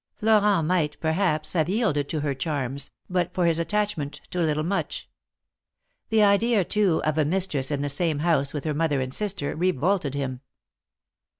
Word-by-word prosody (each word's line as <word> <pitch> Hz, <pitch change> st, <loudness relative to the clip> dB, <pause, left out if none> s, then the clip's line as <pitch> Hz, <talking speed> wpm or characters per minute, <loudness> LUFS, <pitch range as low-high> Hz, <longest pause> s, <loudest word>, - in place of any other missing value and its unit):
Florent 210 Hz, -5 st, +3 dB
might, 160 Hz, -4 st, 0 dB
perhaps, 160 Hz, -2 st, 0 dB
have 160 Hz, -2 st, +1 dB
yielded 185 Hz, -, 0 dB
to 155 Hz, -, -2 dB
her 145 Hz, -1 st, -1 dB
charms, 135 Hz, -1 st, -3 dB, 0.2 s
but 180 Hz, -2 st, -1 dB
for 180 Hz, -, +2 dB
his 165 Hz, -1 st, +2 dB
attachment 170 Hz, -6 st, -1 dB
to 180 Hz, -, -3 dB
little 155 Hz, -2 st, +1 dB
Much. 200 Hz, -, -3 dB, 1.0 s
The 220 Hz, -1 st, +4 dB
idea, 205 Hz, +1 st, +3 dB
too, 195 Hz, -5 st, +1 dB
of 155 Hz, 0 st, 0 dB
a -, -, +4 dB
mistress 155 Hz, -4 st, 0 dB
in 145 Hz, -1 st, -1 dB
the -, -, -1 dB
same 155 Hz, +2 st, +1 dB
house 150 Hz, -3 st, +1 dB
with 145 Hz, -, -5 dB
her 155 Hz, -, -1 dB
mother 150 Hz, -2 st, 0 dB
and 130 Hz, 0 st, -2 dB
sister, 200 Hz, -7 st, -1 dB
revolted 175 Hz, -2 st, 0 dB
him. 130 Hz, -2 st, -3 dB
160 Hz, 170 wpm, -25 LUFS, 145-195 Hz, 1.0 s, The